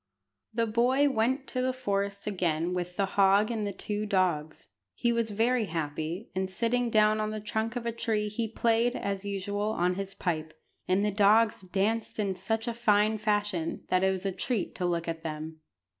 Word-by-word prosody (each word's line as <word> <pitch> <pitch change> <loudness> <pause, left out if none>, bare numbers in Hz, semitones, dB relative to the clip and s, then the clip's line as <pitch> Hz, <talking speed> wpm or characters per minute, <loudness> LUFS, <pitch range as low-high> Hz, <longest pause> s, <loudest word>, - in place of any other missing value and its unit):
The 230 +1 +1
boy 250 +6 +3
went 260 +3 +1
to 255 - -1
the 255 0 +1
forest 200 -5 -2
again 175 -4 0
with 180 0 -3
the 200 - +1
hog 200 +3 +3
and 220 -2 -2
the 205 - -1
two 210 +2 -4
dogs. 180 -6 0 0.3
He 235 -1 +1
was 230 -1 0
very 225 +3 +2
happy, 160 +3 -4
and, 190 +1 -1
sitting 235 +5 0
down 215 -1 +4
on 215 - -1
the 215 0 -4
trunk 220 +2 -2
of 245 -1 -3
a 235 - 0
tree 220 -2 -1
he 220 +2 -2
played, 230 +2 +1
as 200 0 -3
usual, 205 +1 -2
on 180 -1 +1
his 195 +1 -5
pipe; 160 -3 -3 0.3
and 190 +3 +2
the 210 - +1
dogs 210 +2 +4
danced 205 +4 -1
in 200 -3 0
such 220 +5 -2
fine 220 -2 +2
fashion 205 -6 -1
that 185 0 +2
it 190 - +4
was 190 0 -2
a 195 - +1
treat 220 +1 -2
to 180 - -1
look 170 -1 -1
at 165 -1 -3
them. 160 0 -6
205 Hz, 190 wpm, -29 LUFS, 185-225 Hz, 0.3 s, down